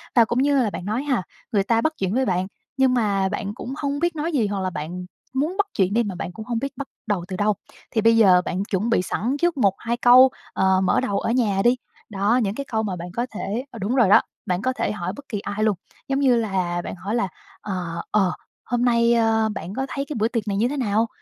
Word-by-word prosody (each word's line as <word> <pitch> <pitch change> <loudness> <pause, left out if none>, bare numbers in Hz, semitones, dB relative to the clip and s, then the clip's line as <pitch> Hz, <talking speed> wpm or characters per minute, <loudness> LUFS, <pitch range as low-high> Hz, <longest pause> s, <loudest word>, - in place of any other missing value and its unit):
Và 230 -2 +7
cũng 240 +3 -1
như 280 -1 +3
là 225 -4 +2
bạn 185 - -6
nói 225 +7 -1
ha, 260 -10 0 0.3
người 200 -3 +2
ta 230 +2 +2
bắt 315 0 +1
chuyện 190 +1 -1
với 260 +1 +2
bạn 185 0 0 0.3
nhưng 265 -1 +4
mà 200 -5 +1
bạn 200 +1 -3
cũng 250 +3 -6
hông 285 0 -2
biết 345 0 0
nói 315 +3 -2
gì 235 -8 +1
hoặc 200 -1 -2
là 185 - -1
bạn 175 +2 -5 0.3
muốn 305 +9 -1
bắt 410 0 +2
chuyện 190 0 +2
đi 235 +1 +3
mà 195 -4 -4
bạn 175 - -5
cũng 220 +2 -8
hông 235 -2 -1
biết 275 +2 -4
bắt 280 - -5 0.2
đầu 185 -4 -1
từ 190 - -5
đâu. 210 +2 +2 0.4
Thì 220 - +1
bây 230 +1 +5
giờ 185 -5 +6
bạn 185 +2 -1
chuẩn 205 +3 -1
bị 230 -6 +3
sẵn 235 +9 -1
trước 345 -4 +2
một 200 -6 +3
hai 235 +1 -2
câu, 250 +2 +7 0.2
ờ, 190 0 +3
mở 185 - +3
đầu 200 -1 0
ở 230 - -1
nhà 210 -6 +2
đi, 240 +1 +5 0.3
đó, 205 +4 +2
những 195 +1 -1
cái 280 +2 -4
câu 220 0 +1
mà 195 -4 -2
bạn 175 +1 -7
có 240 +1 -1
thể, 230 +8 -3
ờ 230 - -9
đúng 215 +7 -1
rồi 235 -7 +4
đó, - - +7 0.2
bạn 180 0 -1
có 255 +3 0
thể 205 - -1
hỏi 185 -2 -4
bất 285 - -11
kỳ 210 - -2
ai 205 +2 -3
luôn 215 -3 +3 0.3
giống 275 0 0
như 260 -3 +4
là 185 -6 0
bạn - - -5
hỏi 195 +5 -3
là, 235 -4 +1 0.3
ờ, 175 -4 -4
ờ, 195 -4 +3 0.3
"Hôm 245 0 0
nay, 235 -1 +4
ơ, 225 -1 +2
bạn 185 - -6
có 265 0 -1
thấy 275 - -3
cái 290 0 -6
bữa 220 - +3
tiệc 230 -3 -3
này 200 -1 -1
như 230 - +2
thế 290 +3 -3
nào?" 225 -2 +1
220 Hz, 270 wpm, -23 LUFS, 195-250 Hz, 0.4 s, Và